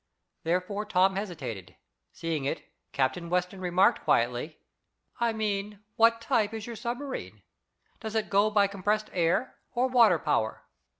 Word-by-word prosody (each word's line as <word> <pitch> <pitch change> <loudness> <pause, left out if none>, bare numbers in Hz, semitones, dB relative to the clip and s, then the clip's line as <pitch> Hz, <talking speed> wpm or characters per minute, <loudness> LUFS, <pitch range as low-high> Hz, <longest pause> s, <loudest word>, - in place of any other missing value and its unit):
Therefore 180 +5 -1
Tom 190 -2 +3
hesitated. 145 - -5 0.4
Seeing 165 -3 -3
it, 140 - -2 0.3
Captain 165 +6 -1
Weston 180 +2 -1
remarked 180 +1 +3
quietly: 125 +7 +1 0.6
"I 235 -1 +2
mean, 210 -1 -3
what 230 0 +5
type 225 -1 +1
is 220 -1 -5
your 235 - -6
submarine? 245 +5 -5 0.6
Does 220 -1 -6
it 220 - -1
go 200 +2 +4
by 205 -1 +4
compressed 205 +2 -1
air, 175 +8 0
or 250 +1 +2
water 230 -8 +6
power?" 130 -8 -1
200 Hz, 135 wpm, -28 LUFS, 170-220 Hz, 0.6 s, water